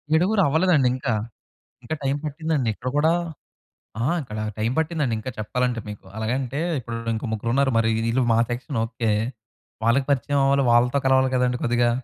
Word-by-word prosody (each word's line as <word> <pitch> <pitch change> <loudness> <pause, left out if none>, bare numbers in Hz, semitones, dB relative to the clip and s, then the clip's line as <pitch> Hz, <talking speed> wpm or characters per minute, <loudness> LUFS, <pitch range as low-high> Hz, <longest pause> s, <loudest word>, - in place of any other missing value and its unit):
ఏడుగురు 195 +6 +3
అవ్వలేదండి 160 -2 +3
ఇంకా. 130 -2 -1 0.7
ఇంకా 125 +6 -3
టైమ్ 140 +1 0
పట్టిందండి 150 -4 -1
ఇక్కడ 125 - -5
కూడా 160 +3 +4 0.9
ఆ! - - +1 0.2
ఇక్కడా 110 -4 -5
టైమ్ 110 +3 0
పట్టిందండి. 155 -6 0
ఇంకా 130 - -5
చెప్పాలంటే 125 +2 -1
మీకు 105 -2 -9
అలాగంటే 125 +5 -2 0.2
ఇప్పుడు 120 -2 -5 0.2
ఇంకో 110 +3 -4
ముగ్గురు 110 +2 -2
ఉన్నారు. 135 +1 +3
మరి 115 0 +3 0.2
వీళ్ళు 120 +3 +1
మా 115 - +3
సెక్షను 120 +1 -3
ఓకే, 115 -1 -2 0.7
వాళ్ళకి 125 +4 +3
పరిచయం 140 +1 +1
అవ్వాలి. 140 0 +3
వాళ్ళతో 125 +3 +4
కలవాలి 130 0 +4
కదండీ 125 -1 +2
కొద్దిగా. 120 0 +2
130 Hz, 160 wpm, -23 LUFS, 115-140 Hz, 0.9 s, కూడా